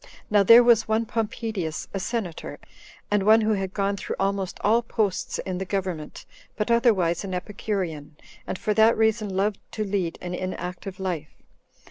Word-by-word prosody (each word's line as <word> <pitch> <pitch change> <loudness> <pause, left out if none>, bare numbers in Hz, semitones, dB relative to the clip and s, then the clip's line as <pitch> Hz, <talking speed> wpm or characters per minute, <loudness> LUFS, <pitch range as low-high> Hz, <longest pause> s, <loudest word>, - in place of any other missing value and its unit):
Now 205 -1 +5
there 230 +5 +8
was 235 -2 +4
one 220 +1 +1
Pompedius, 220 -7 -3
a 195 - -2
senator, 195 -5 -4 0.5
and 205 -1 +3
one 215 +3 +6
who 215 0 +2
had 195 -2 -2
gone 200 0 -1
through - - -4
almost 195 -1 -1
all 225 +3 +3
posts 215 -5 -1
in 185 -1 -4
the - - -2
government, 185 -5 -4 0.3
but 210 +2 -1
otherwise 195 -8 +3
an 190 -2 -4
Epicurean, 180 -6 -4 0.3
and - - -3
for 210 - -1
that 220 +2 +5
reason 220 -1 +2
loved 195 +2 0
to 215 - -2
lead 190 -4 -2
an 180 0 -5
inactive 185 +1 -5
life. 175 -5 -5
200 Hz, 165 wpm, -25 LUFS, 185-220 Hz, 0.5 s, there